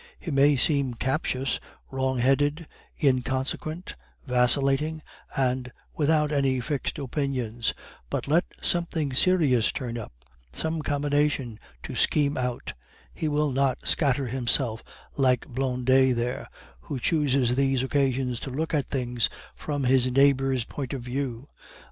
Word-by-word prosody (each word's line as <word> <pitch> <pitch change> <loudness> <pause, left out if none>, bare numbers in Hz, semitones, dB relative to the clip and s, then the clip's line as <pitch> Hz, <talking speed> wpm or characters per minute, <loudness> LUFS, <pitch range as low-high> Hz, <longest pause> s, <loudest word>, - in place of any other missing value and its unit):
He 170 - -6
may 140 +1 +5
seem 135 -1 +1
captious, 135 +1 -1 0.3
wrong 130 -1 0
headed, 145 +6 +2 0.4
inconsequent, 135 +5 -1 0.3
vacillating, 135 +5 +2 0.3
and 125 -1 0 0.2
without 150 0 +2
any 135 -3 +1
fixed 135 +3 -2
opinions; 130 -5 -2 0.3
but - - -2
let 165 +5 +3 0.2
something 165 -5 0
serious 145 -7 +3
turn 120 -4 -4
up, 110 - -8 0.4
some 160 - -2
combination 145 -5 0 0.2
to - - -6
scheme 145 -1 +2
out, 125 -1 -3 0.4
he 160 - -3
will 150 -1 +1
not 135 -1 +1
scatter 140 -2 +1
himself 120 -2 +1 0.4
like 130 -3 +2
Blondet 130 0 +2
here, 120 +1 -2 0.3
who 125 - -5
chooses 135 -3 +2
these 135 -1 +2
occasions 130 -3 0
to - - -6
look 155 +6 -3
at 145 -4 0
things 120 -4 0 0.2
from 145 -2 -3
his 130 0 +3
neighbor's 135 -1 +3
point 135 +2 -6
of 130 -3 -4
view. 125 0 -4
135 Hz, 125 wpm, -26 LUFS, 125-145 Hz, 0.4 s, may